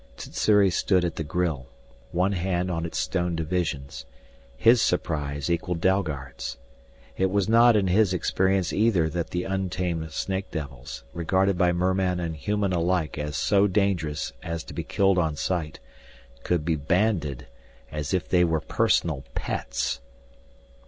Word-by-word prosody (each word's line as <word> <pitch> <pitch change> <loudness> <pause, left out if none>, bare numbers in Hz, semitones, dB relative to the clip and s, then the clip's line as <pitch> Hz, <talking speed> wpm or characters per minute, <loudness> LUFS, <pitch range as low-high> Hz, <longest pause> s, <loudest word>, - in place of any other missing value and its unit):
Sssuri 100 +9 +2
stood 90 0 +2
at 85 - -3
the 80 - -1
grille, 80 -5 -2 0.4
one 90 +3 +1
hand 90 -1 -1
on 85 -1 -2
its - - -6
stone 90 -2 -1
divisions. 75 -5 -3 0.5
His 115 - +5
surprise 75 -5 -1
equaled 85 0 -1
Dalgard's. 70 -9 -1 0.6
It 95 0 +2
was 100 0 +1
not 115 +1 +6
in 100 -2 +3
his 95 +2 +3
experience 95 0 +1
either 100 -7 +3
that 85 +1 -3
the 90 0 -2
untamed 90 -4 -2
snake 95 +3 -3
devils, 70 -4 -7
regarded 95 +3 +1
by 90 0 +3
merman 90 +1 +1
and 85 -2 -3
human 100 +5 -1
alike 85 -2 0
as 75 -1 -3
so 100 0 +3
dangerous 90 -9 0
as 85 -1 -4
to - - -10
be - - -3
killed 95 -2 +2
on 80 -3 0
sight, 80 +2 -2 0.6
could 85 -4 0
be 80 -1 +1
banded 80 - 0 0.5
as 75 -2 -4
if 90 -1 0
they 90 -1 +4
were 80 -2 +2
personal 75 -2 +1
pets! - - -2
90 Hz, 145 wpm, -26 LUFS, 80-95 Hz, 0.6 s, not